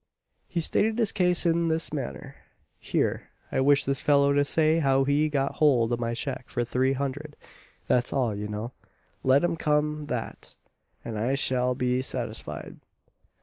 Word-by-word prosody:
He 170 - -2
stated 220 +7 +1
his 225 -4 +2
case 180 -1 +2
in 170 0 +2
this 160 -1 +1
manner: 70 - -6 0.4
"Here - - -2 0.2
I - - 0
wish 140 +1 +4
this 135 0 -1
fellow 140 -1 +3
to 145 0 +3
say 155 +2 +3
how 135 -3 +2
he 145 +3 +1
got 140 -2 -1
hold 120 -6 +3
o' - - 0
my 115 0 -3
cheque 130 0 -5
for 120 - -1
three 130 +3 0
hundred 140 +2 -4 0.5
that's 125 0 +1
all, 125 -5 0
you 105 +1 -5
know; 105 +3 -5 0.5
let 130 +3 +4
him 175 - +1
come 150 -1 0
that, 125 -4 -6 0.5
and 110 -2 -4
I 125 +5 0
shall 125 -2 +1
be 125 0 0
satisfied. 130 - -5
140 Hz, 165 wpm, -26 LUFS, 125-150 Hz, 0.5 s, wish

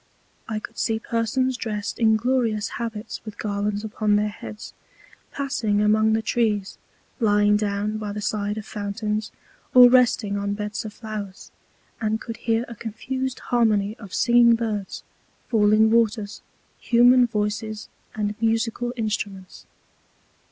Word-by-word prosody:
I 220 - -2
could 225 +1 -8
see 225 -1 +1
Persons 230 +3 -1
dressed 210 -3 -4
in 220 -2 +4
glorious 225 -2 0
Habits 225 -2 -5
with 215 -2 -9
Garlands 205 0 -2
upon 215 -1 0
their 210 0 +1
Heads, 210 0 -9 0.6
passing 235 -7 -1
among 215 +1 +3
the 220 0 0
Trees, 210 -5 -1 0.4
lying 210 -2 +3
down 210 +1 -1
by 210 -1 -4
the 210 - -5
Side 210 0 -2
of 215 - -6
Fountains, 210 +1 -3 0.4
or 250 -1 +10
resting 240 -5 +3
on 200 0 -2
Beds 210 +2 -4
of 215 - -7
Flowers; 215 -4 -7 0.5
and 220 0 0
could 230 0 -7
hear 230 0 0
a 235 - -8
confused 260 +4 -4 0.2
Harmony 215 -3 +2
of 200 -4 -11
singing 240 +1 +5
Birds, 215 -4 -4 0.5
falling 220 -1 +4
Waters, 220 -2 +1 0.4
human 245 +1 +5
Voices, 215 0 -3 0.3
and 210 -1 -1
musical 230 +2 0
Instruments. 205 -4 -4
215 Hz, 135 wpm, -24 LUFS, 210-230 Hz, 0.6 s, or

